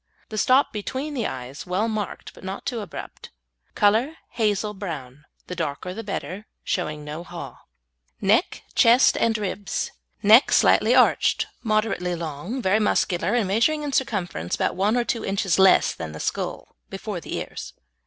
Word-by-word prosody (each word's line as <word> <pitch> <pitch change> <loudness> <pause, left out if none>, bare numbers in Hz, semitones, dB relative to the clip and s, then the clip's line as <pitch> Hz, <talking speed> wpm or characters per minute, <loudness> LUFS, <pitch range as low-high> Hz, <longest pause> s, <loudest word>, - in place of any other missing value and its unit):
The 215 - -5
stop 260 +5 +4
between 260 +8 -4
the 245 -5 -1
eyes 130 +5 -7
well 190 +5 0
marked, 215 -3 -4
but - - -16
not 190 +1 -6
too 240 -3 -2
abrupt. 205 - -9 0.5
Colour 225 +9 +3 0.2
hazel 210 -2 0
brown, 150 -8 -7 0.2
the 180 - -6
darker 165 +2 -3
the 225 +4 -6
better, 200 0 -5 0.2
showing 150 -5 -2
no 150 +3 -6
haw. - - -9 0.6
NECK, 220 - +2
CHEST 240 +1 +5
AND 225 -1 +2
RIBS 205 -1 -3 0.3
Neck 220 +5 +7
Slightly - - +5
arched, - - +4 0.2
moderately 215 -5 0
long, 170 - -5
very 190 +3 +3
muscular, 190 -1 +1
and 225 -5 +1
measuring 235 +10 +2
in 285 -2 -3
circumference 180 - -1
about - - -1
one 205 +6 +2
or 240 - +2
two 235 -1 -2
inches 195 -3 0
less 190 0 +5
than 80 -1 -7
the 80 - -8
skull - - -4
before - - -5
the - - -5
ears. - - -6
205 Hz, 160 wpm, -24 LUFS, 175-225 Hz, 0.6 s, Neck